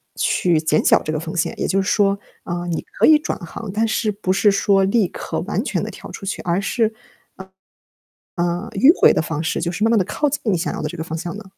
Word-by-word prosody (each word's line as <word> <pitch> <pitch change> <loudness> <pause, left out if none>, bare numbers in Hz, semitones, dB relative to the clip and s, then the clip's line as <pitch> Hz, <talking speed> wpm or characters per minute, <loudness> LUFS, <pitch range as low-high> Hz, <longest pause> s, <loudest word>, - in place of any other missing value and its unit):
去 175 -3 +1
减 155 -1 +1
小 - - +4
这 155 - -3
个 155 - -1
风 160 +1 -6
险？ 170 - 0
也 - - 0
就 195 0 +1
是 190 - -2
说， 200 -1 +2 0.3
呃， 175 0 -4
你 170 -2 -2
可 - - -1
以 310 - +8
转 - - -3
行， 190 +4 -7
但 220 +2 +1
是 220 0 0
不 200 -2 -1
是 205 +2 +4
说 195 0 +3
立 200 +1 +2
刻 - - -5
完 - - -2
全 - - -2
地 - - -4
跳 - - -11
出 195 - -8
去， 195 - -3
而 175 +2 0
是， 225 +2 0 1.4
呃， 175 +3 -1
迂 265 +10 +6
回 - - +7
的 - - +1
方 155 -1 -3
式， 160 - -1
就 170 +1 -1
是 210 - -1
慢 225 - +3
慢 230 - +4
地 190 - +2
靠 295 - -1
近 285 - -2
你 210 -6 +2
想 - - -2
要 - - -4
的 150 - -2
这 175 - -8
个 160 - -4
方 160 0 -5
向 170 +3 -5
呢？ 210 - -9
190 Hz, 280 characters per minute, -20 LUFS, 170-210 Hz, 1.4 s, 以